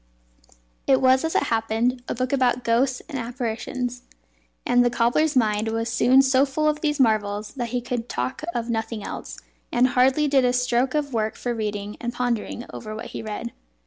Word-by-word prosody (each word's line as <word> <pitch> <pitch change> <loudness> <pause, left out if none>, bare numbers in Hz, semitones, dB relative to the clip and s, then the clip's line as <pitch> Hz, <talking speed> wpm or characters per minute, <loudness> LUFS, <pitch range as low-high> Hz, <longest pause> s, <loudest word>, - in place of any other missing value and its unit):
It 265 -1 +5
was, 260 +1 +4
as 320 - -2
it - - +3
happened, 225 +3 0
a - - -2
book 255 +2 -2
about 250 -2 +2
ghosts 250 +3 +1
and 285 -5 -4
apparitions; 245 +1 -4 0.6
and 245 0 +4
the 245 - +3
cobbler's 245 +6 +2
mind 215 -3 +2
was 225 +1 -2
soon 260 +3 +5
so 265 0 +4
full 285 +2 0
of 300 0 0
these 295 -2 0
marvels 215 -3 +1
that 245 -3 -4
he 245 +1 -1
could 240 -1 -4
talk 125 +1 -3
of 235 -1 -2
nothing 225 -2 -3
else, - - -7 0.3
and 250 +2 +3
hardly 260 +4 +3
did 275 -2 +3
a 250 0 +2
stroke 250 +2 +1
of 290 -3 -1
work 220 -1 -1
for 245 - -3
reading 210 -2 -4
and 240 0 -3
pondering 245 -1 -2
over 215 -1 -7
what 220 - -7
he - - -4
read. 220 +2 -5
245 Hz, 190 wpm, -24 LUFS, 225-260 Hz, 0.6 s, It